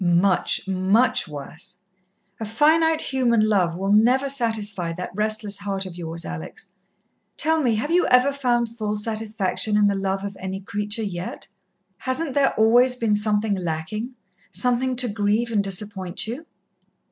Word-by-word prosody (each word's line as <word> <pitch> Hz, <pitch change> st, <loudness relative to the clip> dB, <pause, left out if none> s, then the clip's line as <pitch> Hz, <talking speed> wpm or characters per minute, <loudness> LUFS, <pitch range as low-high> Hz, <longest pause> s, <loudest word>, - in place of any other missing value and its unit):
"Much, 180 Hz, +2 st, +2 dB
much 195 Hz, +6 st, +2 dB
worse. 150 Hz, +1 st, -9 dB, 0.6 s
A -, -, -4 dB
finite 315 Hz, +8 st, +3 dB
human 250 Hz, -4 st, +1 dB
love 185 Hz, -6 st, +1 dB
will 195 Hz, +2 st, -2 dB
never 250 Hz, +6 st, +4 dB
satisfy 215 Hz, -9 st, -2 dB
that 180 Hz, +2 st, -6 dB
restless 215 Hz, -1 st, -1 dB
heart 195 Hz, -1 st, -3 dB
of 185 Hz, -2 st, -8 dB
yours, 170 Hz, -1 st, 0 dB
Alex. -, -, -8 dB, 0.7 s
Tell 320 Hz, 0 st, +2 dB
me, 240 Hz, -5 st, +2 dB
have 255 Hz, +9 st, -2 dB
you 355 Hz, +1 st, +3 dB
ever 250 Hz, +3 st, +4 dB
found 240 Hz, -4 st, 0 dB
full 215 Hz, -2 st, -3 dB
satisfaction 215 Hz, -1 st, -1 dB
in 210 Hz, -, +4 dB
the 200 Hz, -, +3 dB
love 195 Hz, 0 st, -2 dB
of 200 Hz, -1 st, -5 dB
any 190 Hz, +1 st, -5 dB
creature 210 Hz, +3 st, -2 dB
yet? 180 Hz, -3 st, -6 dB, 0.5 s
Hasn't 270 Hz, +3 st, -2 dB
there 275 Hz, -1 st, +2 dB
always 245 Hz, +3 st, +4 dB
been 230 Hz, -4 st, 0 dB
something 210 Hz, 0 st, +1 dB
lacking 190 Hz, +7 st, -4 dB, 0.4 s
something 250 Hz, +1 st, 0 dB
to 250 Hz, 0 st, +1 dB
grieve 210 Hz, +2 st, 0 dB
and 205 Hz, -3 st, +1 dB
disappoint 195 Hz, -1 st, -3 dB
you?" 255 Hz, +9 st, -6 dB
215 Hz, 150 wpm, -23 LUFS, 195-245 Hz, 0.7 s, never